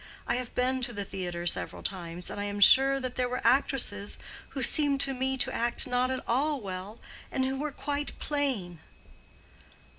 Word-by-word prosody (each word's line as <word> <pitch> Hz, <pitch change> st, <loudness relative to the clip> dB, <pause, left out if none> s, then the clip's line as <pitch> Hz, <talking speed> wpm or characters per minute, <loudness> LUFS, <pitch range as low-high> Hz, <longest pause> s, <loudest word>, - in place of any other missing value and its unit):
I 240 Hz, -, 0 dB
have 250 Hz, -1 st, -5 dB
been 255 Hz, +1 st, +1 dB
to 240 Hz, -1 st, -2 dB
the 200 Hz, -2 st, -4 dB
theatre 175 Hz, -3 st, -5 dB
several 175 Hz, -, 0 dB
times, 175 Hz, -2 st, -3 dB
and 205 Hz, -, -5 dB
I -, -, -2 dB
am 205 Hz, 0 st, -4 dB
sure 270 Hz, +6 st, +7 dB
there 255 Hz, -1 st, -2 dB
were 250 Hz, -, -2 dB
actresses 235 Hz, -5 st, +2 dB, 0.3 s
who 270 Hz, -, -3 dB
seemed 285 Hz, +2 st, +4 dB
to 270 Hz, -, +2 dB
me 265 Hz, +1 st, -1 dB
to 245 Hz, -, 0 dB
act 235 Hz, +1 st, 0 dB
not 250 Hz, 0 st, +1 dB
at 260 Hz, 0 st, -3 dB
all 285 Hz, +5 st, +1 dB
well 195 Hz, +1 st, -6 dB, 0.3 s
and 260 Hz, -, 0 dB
who 265 Hz, 0 st, -2 dB
were 300 Hz, +1 st, -2 dB
quite 290 Hz, +1 st, -4 dB
plain." 255 Hz, -, -2 dB
250 Hz, 180 wpm, -29 LUFS, 205-270 Hz, 0.3 s, sure